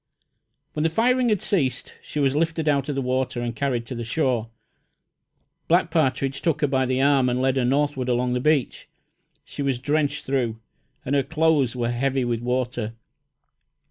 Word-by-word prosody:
When 150 - -2
the 160 - +2
firing 245 +7 +2
had 210 -4 +1
ceased, 135 - -1
she 150 - -5
was 140 -1 +2
lifted 160 0 0
out 140 -1 +1
of 145 - -2
the 135 - -1
water 130 0 -1
and 120 -1 -3
carried 120 -1 -1
to 120 - -7
the 120 -1 -4
shore. 120 -2 0 1.2
Black 170 0 +3
Partridge 135 -4 0
took 160 -3 0
her 145 - +3
by 130 -1 +1
the 130 0 0
arm 135 -2 +3
and 125 +1 0
led 130 0 +1
her 125 - +2
northward 135 -1 0
along 125 0 +1
the 125 - 0
beach. 150 -1 0 0.6
She - - -7
was 135 -3 0
drenched 145 +3 -1
through, 120 -5 -1 0.5
and 135 - -2
her 140 - +4
clothes 155 -4 +1
were 120 -1 -1
heavy 130 +1 0
with 120 -1 -1
water. 120 -2 -2
135 Hz, 180 wpm, -24 LUFS, 125-150 Hz, 1.2 s, her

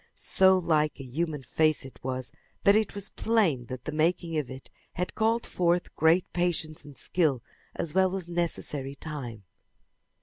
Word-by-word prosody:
So 190 0 +4
like 155 -4 +1
a - - -6
human 150 +2 -3
face 155 0 +1
it 135 - -12
was 130 -1 -3 0.3
that 200 - +6
it 215 -1 +1
was 200 -1 -1
plain 180 - +1
that 130 -1 -7
the - - -3
making 165 +2 0
of 150 -4 -1
it 130 0 -10 0.2
had 180 0 -3
called 225 +2 +1
forth 175 0 0
great 165 +3 +4
patience 170 -3 -1
and 145 -3 -13
skill 150 -9 +1 0.3
as 160 - -2
well 190 0 +3
as 185 -3 -4
necessary 150 -5 -2
time. 130 -9 -6
160 Hz, 165 wpm, -28 LUFS, 140-180 Hz, 0.3 s, that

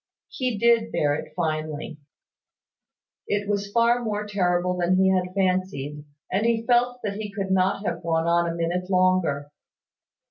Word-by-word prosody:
He 250 -4 -2
did 230 +1 +3
bear 145 -1 +1
it 150 - -5
finely. 155 -2 -3 1.3
It 205 0 -1
was 200 0 -2
far 235 +2 +3
more 210 -2 -2
terrible 180 -3 0
than 180 +1 +1
he 190 0 +4
had 185 0 -1
fancied; 180 -7 -1 0.3
and 195 +3 +1
he 230 0 +1
felt 245 0 +2
that 200 -1 -3
he 210 -1 -5
could 195 -1 -3
not 190 +2 +1
have 170 -2 -2
gone 165 -1 0
on 170 0 +2
a 165 - -3
minute 175 +2 -2
longer. 180 -6 +1
185 Hz, 155 wpm, -24 LUFS, 170-210 Hz, 1.3 s, he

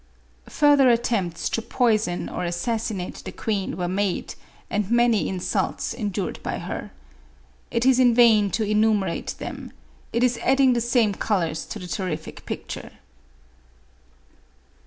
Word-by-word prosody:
Further 290 -3 +5
attempts 225 -8 0
to 230 - -1
poison 220 -6 0
or - - -4
assassinate 190 +2 -2
the - - -6
queen 200 -6 -2
were 180 -1 -1
made, 190 +1 -1 0.3
and 205 -2 -2
many 235 -2 +3
insults 185 -2 -2
endured 205 -4 -3
by - - -3
her. - - -5 0.8
It 235 +1 0
is 260 -1 +5
in 245 -2 +5
vain 220 -4 +6
to 220 - +1
enumerate 210 -4 +1
them; - - -7 0.4
it 235 +1 +1
is 250 -1 +2
adding 265 0 +4
the 240 - 0
same 235 -3 +2
colors 170 -6 -1
to - - -6
the 180 - -8
terrific 165 -2 -5
picture. - - -6
215 Hz, 135 wpm, -24 LUFS, 185-240 Hz, 0.8 s, vain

